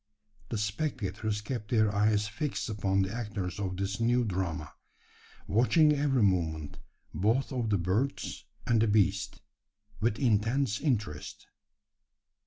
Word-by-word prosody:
The 115 - -2
spectators 105 -2 -2
kept 105 -1 -5
their 110 -3 +3
eyes 105 +1 +2
fixed 120 +5 -3
upon 100 -2 +1
the 95 +2 -3
actors 105 -6 -4
of 95 -2 -3
this 95 +1 -2
new 120 +1 +2
drama 90 -5 -3 0.7
watching 150 +8 +4
every 140 -4 +2
movement, 80 -6 0 0.3
both 110 - +1
of 120 -4 -1
the 100 - +3
birds 100 +10 -2 0.2
and 115 -2 +3
the 115 - +3
beast, 100 -2 +1 0.6
with 110 0 +1
intense 115 0 +1
interest. 110 - -2
105 Hz, 125 wpm, -30 LUFS, 95-120 Hz, 0.7 s, watching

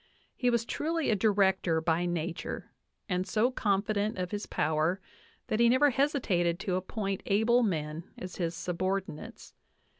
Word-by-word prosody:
He 250 - +1
was 235 -1 +1
truly 320 +3 -1
a - - +3
director 190 -5 +2
by 165 +2 +1
nature, 170 0 -4 0.4
and 185 -1 -1
so 220 +6 +2
confident 205 -2 0
of 180 -1 -3
his 205 0 -4
power 160 +4 +1 0.5
that 215 - -1
he 235 0 +6
never 265 +4 +5
hesitated 225 - +1
to 190 - -2
appoint 195 +1 -2
able 220 +5 +4
men 160 -6 -2
as 180 0 -7
his 170 -2 -1
subordinates. 180 -1 -4
195 Hz, 145 wpm, -30 LUFS, 175-220 Hz, 0.5 s, he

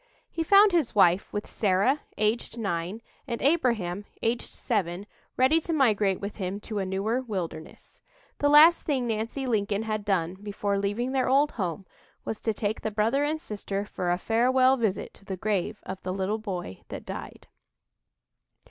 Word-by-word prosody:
He 330 - -3
found 400 +5 +6
his 330 -11 +1
wife, 180 -1 +4
with 205 - -3
Sarah, 205 +8 +1 0.2
aged 215 +2 0
nine, 195 0 -3 0.2
and 235 -2 -3
Abraham, 230 - +1 0.2
aged 235 +1 -1
seven, 195 -5 -2 0.3
ready 285 +6 +4
to 330 - -3
migrate 210 - +2
with 200 +1 -6
him 195 0 -3
to 215 -1 -4
a 190 - -2
newer 205 +6 -1
wilderness. 185 -9 -7 0.4
The 290 - +3
last 310 +4 +8
thing 270 -5 -1
Nancy 230 +4 -2
Lincoln 210 -3 0
had 215 -1 -2
done 185 -3 0
before 205 -1 -2
leaving 205 +6 -1
their 260 -1 +1
old 285 +3 +4
home 190 -2 -3 0.4
was 220 - -4
to 225 - 0
take 210 0 -2
the - - -1
brother 220 +7 +1
and 310 +2 -1
sister 205 -4 -4
for 180 -3 -3
a 175 - +2
farewell 255 +5 +3
visit 220 -6 -2
to 200 - -18
the 190 -1 -4
grave 210 +1 -2
of 190 0 -6
"the 185 - -4
little 195 +3 -1
boy 180 - -5
that - - -8
died." - - -8
215 Hz, 170 wpm, -27 LUFS, 195-255 Hz, 0.4 s, last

